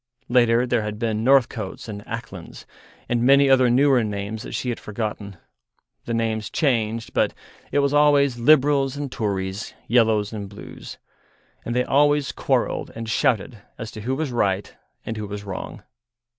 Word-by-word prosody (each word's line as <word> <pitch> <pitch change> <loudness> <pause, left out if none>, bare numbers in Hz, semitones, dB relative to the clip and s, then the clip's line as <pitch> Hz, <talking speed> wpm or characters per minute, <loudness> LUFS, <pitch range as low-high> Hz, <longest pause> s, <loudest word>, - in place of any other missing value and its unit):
Later 120 -1 +4
there 120 -2 +1
had 105 0 -4
been 110 -1 -1
Northcotes 120 -7 +1
and 105 -2 -6
Aclands, 105 -6 -8 0.4
and 120 -1 0
many 140 +3 +5
other 130 -2 +5
newer 130 0 +4
names 105 +1 -4
that - - -8
she 125 - -2
had 120 - -3
forgotten; 105 -2 -5 0.7
the 120 - -3
names 110 -2 -1
changed, 115 -5 -1
but - - +1 0.4
it - - 0
was 140 - 0
always 145 -4 +4
Libruls 140 +1 +3
and 145 -2 -4
Toories, 100 -2 -3
Yellows 110 -3 +2
and 100 -2 -6
Blues. 100 - -10 0.7
And 120 - -3
they 125 - +2
always 145 +1 +2
quarrelled - - -1
and 115 0 -6
shouted 115 -2 0 0.2
as 115 -2 -6
to 110 - -8
who 130 +5 -1
was 150 -1 -2
right 100 -4 -1 0.3
and 110 - -4
who 105 -1 -4
was 100 0 -6
wrong. 95 -2 -7
115 Hz, 160 wpm, -23 LUFS, 105-130 Hz, 0.7 s, many